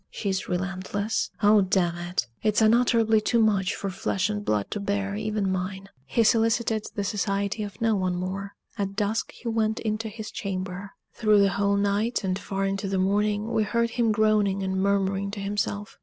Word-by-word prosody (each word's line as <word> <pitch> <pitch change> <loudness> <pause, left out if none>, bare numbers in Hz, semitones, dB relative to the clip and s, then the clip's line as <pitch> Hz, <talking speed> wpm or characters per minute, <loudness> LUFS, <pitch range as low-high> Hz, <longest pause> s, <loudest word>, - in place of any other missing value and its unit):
she's 190 -3 -3
relentless. 190 +3 -2
Oh, 210 0 +6
damn 185 -2 +1
it! 175 -5 -2 0.2
It's 215 -1 +2
unutterably 225 -1 +4
too 235 +2 +1
much 205 -4 +2
for 195 - -4
flesh 185 +2 -1
and 205 0 -3
blood 105 - -1
to - - -2
bear, 200 0 -1
even 210 -2 -1
mine." 190 +1 -4 0.2
He 230 - +2
solicited 225 0 +2
the 205 - -1
society 200 +1 -1
of 205 -2 -6
no 225 -1 +2
one 185 -2 0
more. 190 +2 -4 0.2
At 195 -1 -2
dusk 215 +1 -1
he 245 - -10
went 220 -1 0
into 220 0 -2
his 215 0 -7
chamber. 190 0 -5 0.2
Through 215 -2 +4
the 200 - +4
whole 200 +1 +1
night, 205 +4 0
and 185 0 -1
far 195 -1 -2
into 195 0 -2
the 195 0 -1
morning, 205 +3 +1
we 220 - +2
heard 235 +2 0
him 235 -2 +1
groaning 210 -2 +2
and 190 0 -1
murmuring 200 0 +1
to 205 +1 -6
himself. 205 +1 -3
200 Hz, 185 wpm, -26 LUFS, 195-215 Hz, 0.2 s, Oh